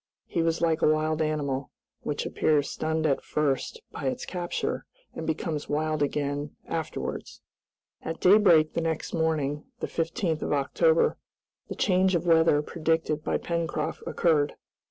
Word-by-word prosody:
He 170 - -1
was 165 0 0
like 165 -1 +2
a - - +5
wild 155 +1 0
animal, 145 -3 -1 0.3
which - - -3
appears 145 -2 +1
stunned 160 0 -1
at 140 -3 +1
first 150 - -1
by - - -6
its 255 -1 -2
capture, 175 -2 -3 0.3
and 160 - -6
becomes 160 -1 -2
wild 155 +1 0
again 145 0 -1
afterwards. - - -4 0.6
At 165 0 -5
daybreak 180 -6 +6
the 170 - 0
next 160 -1 -2
morning, 155 -3 0
the - - -2
15th 165 -1 -1
of - - -1
October, 470 - +2 0.5
the - - -4
change 185 -1 +3
of 170 0 0
weather 160 -3 +4
predicted 160 -1 -1
by - - 0
Pencroft 170 -1 -2
occurred. 150 -4 +2
160 Hz, 145 wpm, -27 LUFS, 150-170 Hz, 0.6 s, daybreak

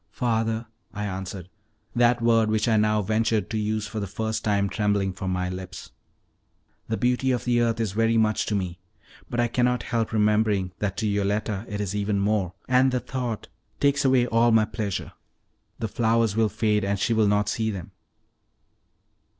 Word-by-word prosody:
"Father," 115 -1 -1 0.3
I 105 0 -3
answered, 95 -2 -5 0.5
that 120 0 +3
word 115 -2 +4
which 110 +1 +1
I 115 - +3
now 105 0 +2
ventured 110 0 0
to 110 - -1
use 105 0 -1
for 110 +1 -5
the 100 - -3
first 110 +3 -3
time 100 -2 +1
trembling 100 -2 0
from 95 0 -4
my 90 0 -1
lips, 90 -1 -7 1.0
"the 110 - -1
beauty 125 +1 +1
of 125 -2 0
the 120 -1 +2
earth 115 -1 +1
is 110 -4 0
very 115 +2 +2
much 110 -1 +2
to 105 - 0
me, 90 -3 -3 0.5
but 120 - -3
I 120 - +3
cannot 125 0 +1
help 115 -2 -1
remembering 105 -3 +2
that 100 -2 -2
to 110 - 0
Yoletta 100 +1 -1
it 105 - -4
is 100 -1 -2
even 105 0 0
more, 100 -3 0
and 130 +1 +4
the 125 - 0
thought 125 -2 -4 0.3
takes 140 0 +2
away 130 -2 +4
all 115 0 +3
my 110 -1 +5
pleasure. 105 -3 -4 0.7
The 115 - -2
flowers 115 -1 +1
will 110 -1 +3
fade, 105 -2 +1
and 100 +1 0
she 115 - +1
will 110 -2 +3
not 105 0 +2
see 110 +1 -1
them." 95 -5 -6
110 Hz, 185 wpm, -25 LUFS, 100-115 Hz, 1.0 s, my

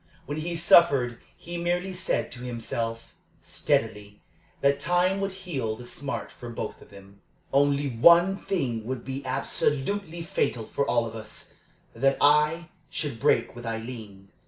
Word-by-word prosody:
When 145 +2 -4
he 170 +2 -3
suffered 140 -8 +5 0.2
he 175 0 -6
merely 175 +2 -1
said 180 0 -1
to 125 - -6
himself, 115 -1 -4 0.3
steadily, 105 -2 -1 0.4
that 140 0 +3
time 180 +5 +2
would 195 0 -1
heal 165 -13 -3
the 120 +2 -10
smart 140 +3 -4
for 120 - -9
both 115 - -5
of - - -16
them. 100 0 -15 0.3
"Only 140 +1 +3
one 170 +10 +6
thing 135 - -2
would 130 -2 -4
be 135 +1 -4
absolutely 155 +6 -1
fatal 120 -8 -1
for 140 - -1
all 120 -1 +2
of 115 0 -7
us 110 -1 -7 0.4
that 135 0 +2
I 150 +3 +4 0.2
should 140 -7 -4
break 115 +1 +2
with 120 - -9
Aileen." 110 -4 -7
135 Hz, 150 wpm, -27 LUFS, 115-170 Hz, 0.4 s, one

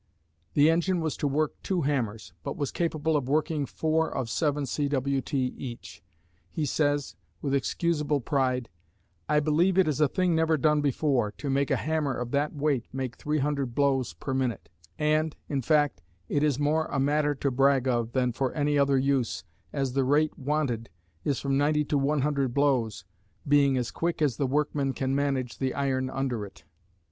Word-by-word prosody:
The 145 +1 +6
engine 175 +2 +1
was 160 -2 -1
to 145 - 0
work 150 +2 0
two 180 -4 -1
hammers, 115 - -2
but - - -4
was 140 -2 -2
capable 160 -2 0
of 135 -3 -1
working 150 -1 0
four 160 +3 0
of 115 -3 -3
7 150 -2 0
cwt. 140 0 -1
each. 125 -2 -4 0.5
He 155 - -2
says, 145 - 0 0.2
with 140 - -2
excusable 150 +1 0
pride, 130 -3 0 0.6
I 150 - +4
believe 165 +5 +2
it 190 - +5
is 155 0 0
a 150 - +6
thing 180 +4 +1
never 160 0 +2
done 150 +1 +3
before, 135 -6 +1
to 140 0 -4
make 140 +1 +1
a - - +3
hammer 155 -4 -1
of 120 0 -4
that 145 +2 0
weight 140 -4 0
make 130 -2 -4
300 145 -4 -1
blows 135 - +1
per 105 - -5
minute; 130 -9 -2 0.3
and, 155 +1 +1
in 140 -2 -1
fact, 145 - +2 0.3
it 145 - 0
is 145 -4 +2
more 155 +2 +1
a - - -2
matter 145 +1 +2
to 140 0 -1
brag 135 0 +3
of 120 -2 0
than 125 -2 +1
for 130 +2 -1
any 145 -1 +1
other 140 -1 +3
use, 130 -3 0 0.3
as 135 -3 -2
the 135 0 +2
rate 150 +4 +2
wanted 135 -5 -1 0.3
is 140 -3 0
from 135 0 0
90 150 +1 +2
to 145 0 +1
100 140 -2 0
blows, 125 -9 +1 0.4
being 140 -2 +4
as 125 -2 -2
quick 170 0 -2
as 145 -7 +1
the 140 - 0
workmen 140 0 0
can 130 +1 -1
manage 135 -3 -1
the 130 -1 -1
iron 130 -2 0
under 130 -5 -2
it. 100 - -11
140 Hz, 180 wpm, -27 LUFS, 130-150 Hz, 0.6 s, The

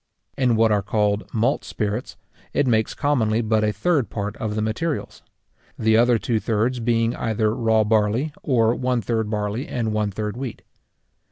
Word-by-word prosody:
In 125 -3 +2
what 110 0 +3
are 105 -1 +3
called 105 +1 0
malt 120 +5 +1
spirits, 105 +2 -3 0.4
it 145 - +2
makes 110 -3 +1
commonly 120 -7 +1
but 110 -1 +1
a 105 - +2
third 135 - 0
part 105 -1 -4
of 105 -1 -3
the 110 - -1
materials; 145 +9 -3 0.6
the 110 0 +3
other 120 +1 +4
two 115 0 -1
thirds 115 +3 0
being 115 0 +1
either 110 -1 0
raw 110 -3 +2
barley, 110 +7 +1
or 115 -4 +2
one 125 -1 0
third 110 0 -1
barley 105 +4 -2
and 115 -3 -2
one 105 -1 0
third 105 +2 -4
wheat. 125 -2 -6
110 Hz, 170 wpm, -23 LUFS, 105-120 Hz, 0.6 s, other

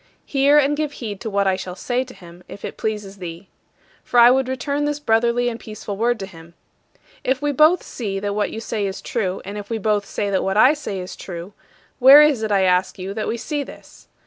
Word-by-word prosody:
Hear 280 +1 +3
and 295 0 +3
give 300 -1 -2
heed 210 -7 -6
to 225 - -4
what 200 -1 +1
I 190 -1 +2
shall 185 -1 -6
say 245 +5 -1
to 255 - -13
him, 175 0 -14
if 200 - -9
it - - -6
pleases 210 -2 -4
thee. 175 0 -8 0.5
For 245 - +2
I 240 +1 +8
would 265 0 +2
return 280 +3 -2
this 295 0 -2
brotherly 235 -1 +2
and 235 -1 -3
peaceful 215 -2 -7
word 235 +3 0
to - - -3
him: 170 -2 -15 0.7
"If 260 +1 0
we 290 0 0
both 310 +5 +4
see 200 -5 -4
that 200 0 -2
what 210 0 0
you 220 - -6
say 215 -2 -2
is 190 - -5
true, 195 -5 -3
and 200 +2 -6
if 205 - -10
we 230 - -1
both 210 -1 0
say 205 -1 -2
that 190 - +1
what 195 +1 -1
I 255 +6 +7
say 295 -10 -5
is 180 0 -7
true, 175 +1 -8 0.5
where 275 +4 +9
is 295 -6 +2
it, 220 -1 -2
I 195 -1 +3
ask 180 0 +1
you, 190 +1 -5
that 215 0 -3
we 235 - -2
see 290 +5 -3
this? 280 - -12
220 Hz, 240 wpm, -21 LUFS, 195-260 Hz, 0.7 s, where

